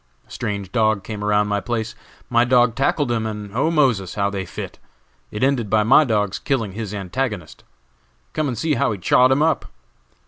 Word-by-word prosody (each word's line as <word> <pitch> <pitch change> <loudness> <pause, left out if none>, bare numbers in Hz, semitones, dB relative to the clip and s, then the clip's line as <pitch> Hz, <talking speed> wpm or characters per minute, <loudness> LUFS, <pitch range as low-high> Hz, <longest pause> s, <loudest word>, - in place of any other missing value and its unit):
A - - -22
strange 100 -5 -4
dog 110 -4 +1
came 105 -1 -6
around 105 0 +2
my 105 0 0
place; 110 +1 -3 0.3
my 120 -1 +3
dog 120 -1 +3
tackled 135 +1 0
him, 110 -2 -1
and 105 -2 -6
'oh, 140 +6 +2
Moses,' 125 - +1
how 100 -1 0
they 95 -2 -4
fit! - - -7 0.5
It 105 - -4
ended 130 -6 +1
by 110 0 +3
my 135 +7 +6
dog's 105 -5 0
killing 115 -8 -1
his 105 0 -5
antagonist. 100 - -4 0.7
Come 155 -1 -1
and 125 -4 -3
see 155 +6 0
how 140 -2 +1
he - - -5
chawed 125 +7 +4
him 140 +3 +3
up!" 160 - 0
110 Hz, 195 wpm, -21 LUFS, 105-130 Hz, 0.7 s, my